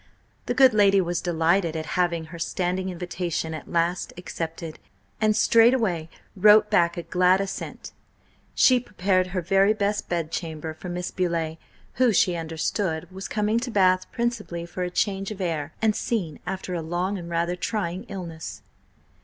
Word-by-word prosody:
The 245 - 0
good 260 -2 +6
lady 200 -2 +5
was 175 -1 -1
delighted 170 0 +1
at 160 -1 -3
having 170 -1 0
her 170 - -8
standing 180 +2 -1
invitation 175 -2 -3
at 155 - -8
last 170 +1 0
accepted, 165 -2 -6 0.4
and 215 -1 +3
straightway 225 -10 +3 0.3
wrote 210 +2 +6
back 170 0 +3
a 170 - -3
glad 185 +2 +3
assent. 195 0 -5 0.6
She 255 -1 +5
prepared 185 -5 0
her 180 -1 -3
very 195 +4 +4
best 205 -1 -1
bedchamber 160 -2 -3
for 180 +3 -9
Miss 175 0 -4
Beauleigh, 165 -3 -1 0.4
who, 250 -2 +6
she 180 -3 +3
understood, 165 +1 -2
was 190 +1 -6
coming 215 +1 +1
to 250 +1 -4
Bath 185 -4 +2
principally 220 -8 -2
for 175 +2 -7
a 180 - -1
change 195 +1 -1
of 210 -2 -7
air 160 -5 -2
and 215 -1 +3
scene 180 -11 -2
after 190 -1 -4
a 170 - -2
long 175 +5 -2
and 170 -1 -8
rather 170 +1 0
trying 185 0 -3
illness. 165 - -7
180 Hz, 160 wpm, -25 LUFS, 170-200 Hz, 0.6 s, good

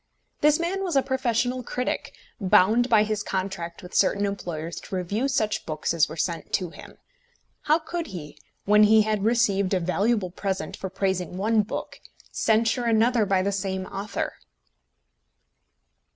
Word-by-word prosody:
This 300 +1 +4
man 370 +3 -1
was 355 -5 -2
a 270 - +4
professional 255 -1 0
critic, 250 +1 -3 0.3
bound 215 +5 +4
by 220 -3 +5
his 215 -1 -2
contract 185 -4 -4
with 180 - -11
certain 200 +1 +2
employers 170 -5 -4
to - - -6
review 200 +8 -1
such 220 -6 0
books 155 +1 -2
as 165 -2 +3
were 160 - -8
sent 170 0 -3
to 180 -3 0
him. - - -13 0.7
How 305 +1 +4
could 335 0 -5
he, 150 -6 -8 0.3
when 210 +1 +6
he 215 +1 +6
had 215 -2 -1
received 205 -4 +2
a - - +2
valuable 195 +2 0
present 195 +1 -3
for 190 - -5
praising 185 -2 -2
one 215 +3 +2
book, 205 - -6 0.3
censure 225 +2 +1
another 230 -1 +3
by 190 -1 +2
the 200 - 0
same 190 -1 -2
author? 200 +2 -4
205 Hz, 155 wpm, -25 LUFS, 185-235 Hz, 0.7 s, when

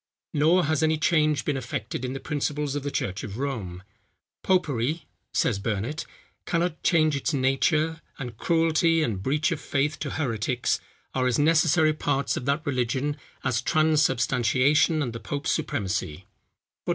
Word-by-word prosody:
Nor 160 +4 +4
has 155 0 +1
any 160 0 +2
change 155 -4 +2
been 145 - 0
effected 125 -2 -4
in 130 0 -3
the 135 - -5
principles 150 -1 -2
of 145 - -2
the 145 - -3
church 100 -7 -3
of 105 -1 -6
Rome. 110 -10 -4 0.6
"Popery," 155 -4 0 0.3
says 105 -5 +1
Burnet, 115 - -3 0.4
"cannot 170 -1 -1
change 155 -4 +3
its 145 +3 -1
nature, 155 +5 +1 0.2
and 120 -4 -6
cruelty 165 +3 +2
and 105 -9 -2
breach 150 - +1
of 160 - -2
faith 145 +2 -1
to 145 - -3
heretics, 125 -3 -1 0.3
are 130 -1 +1
as 125 - +1
necessary 155 +1 +4
parts 140 -2 -1
of 125 - -4
that 140 +3 0
religion, 130 +2 -1 0.3
as 120 -2 0
transubstantiation 145 -1 +2
and 120 -4 -4
the 115 - -6
pope's 145 +4 -3
supremacy." 95 - -2
145 Hz, 150 wpm, -26 LUFS, 125-155 Hz, 0.6 s, Nor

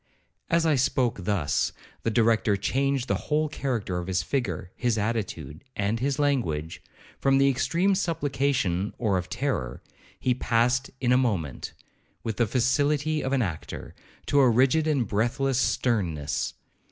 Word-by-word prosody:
As 170 0 +3
I 160 - +4
spoke 125 -7 +1
thus, 95 -8 0 0.3
the - - 0
Director 110 -3 +3
changed 135 +4 0
the - - +1 0.2
whole 155 +1 +2
character 120 -11 -2
of 90 - -6
his 90 -2 0
figure, 90 - -2
his 120 -3 0
attitude, 100 -9 -3
and 105 +3 0
his 135 +2 0
language;—from 135 - -1
the 135 0 +4
extreme 165 +8 +2
of 190 - +2
supplication 135 - 0
or 100 -6 +1
of 90 - -7
terror, 130 - -2 0.4
he 125 - +2
passed 125 +2 +1
in 125 -1 +2
a 125 - +6
moment, 95 - -1 0.5
with 110 -2 -3
the 120 - +2
facility 145 +6 +1
of 130 - -2
an 135 -3 +2
actor, 85 -6 -6 0.3
to 145 - +3
a 130 -3 +6
rigid 135 +7 +3
and 140 -7 +1
breathless 120 +6 0
sternness. 85 - 0
120 Hz, 150 wpm, -26 LUFS, 100-140 Hz, 0.5 s, a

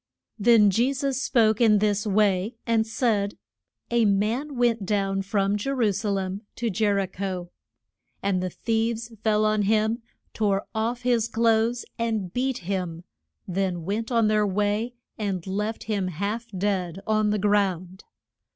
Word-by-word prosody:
Then 210 -2 +6
Je 240 +7 +2
sus 270 -1 -1
spoke 220 -4 +3
in 215 -3 +6
this 210 0 +1
way, 205 +1 +2
and 225 -1 +2
said, 220 -3 0 0.5
A 235 -1 +3
man 220 +9 0
went 235 -3 +2
down 195 -1 0
from 200 0 0
Je 210 +6 -3
ru 245 -6 +2
sa 205 +2 -2
lem 195 0 -2
to 235 -2 -1
Je 210 +2 +1
ri 200 -1 +1
cho. 185 -2 -5 0.7
And 195 -2 +1
the 185 - -2
thieves 230 +3 -2
fell 215 -1 +3
on 215 0 +2
him, 220 +3 +1 0.3
tore 200 -2 0
off 235 +2 -2
his 240 -3 +2
clothes 230 +1 +1
and 220 -6 -1
beat 250 -6 -1
him, 180 -4 -3 0.4
then 185 -2 -1
went 220 +5 -2
on 230 -2 +3
their 215 -1 +2
way 210 +4 0 0.2
and 195 -5 -2
left 210 +3 -3
him 205 -4 -1
half 200 +7 -3
dead 190 -3 -2
on 215 -1 +2
the 210 - +1
ground. 190 -3 0
210 Hz, 155 wpm, -25 LUFS, 195-230 Hz, 0.7 s, Then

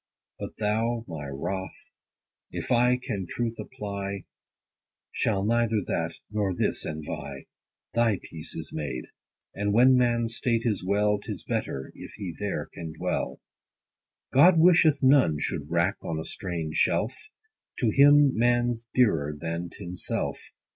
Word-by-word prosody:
But - - -7
thou, 115 +2 0
my 80 -5 -6
Wroth, 90 +8 -5 0.6
if - - -5
I 125 +1 +4
can 105 -8 -4
truth 115 -1 -2
apply, 100 -5 -5 0.9
Shalt 100 -3 0
neither 115 -1 +2
that, - - -2 0.2
nor 100 -3 0
this - - 0
envy: 75 -1 -6 0.5
Thy 115 -4 +3
peace 80 -1 -7
is - - -6
made; 70 -5 -3 0.5
and 100 +1 -1
when 125 +4 +6
man's 120 -2 +2
state 115 -2 0
is 105 -6 0
well, 105 +2 +2
'Tis - - -6
better, 65 - -3
if - - -10
he 95 -5 -6
there 105 -1 -2
can 80 -1 -7
dwell. - - -2 0.9
God 170 +6 +7
wisheth 165 -3 +5
none 130 - +5
should 75 -1 -3
wrack 85 +3 +1
on 80 - -3
a 80 - -5
strange 85 -5 -4
shelf: 115 - +2 0.7
To 115 -4 +3
him 145 +1 +6
man's 120 0 +1
dearer, 75 - +2
than 85 +2 -3
t' 100 - -10
himself. 90 0 -3
105 Hz, 140 wpm, -27 LUFS, 85-120 Hz, 0.9 s, God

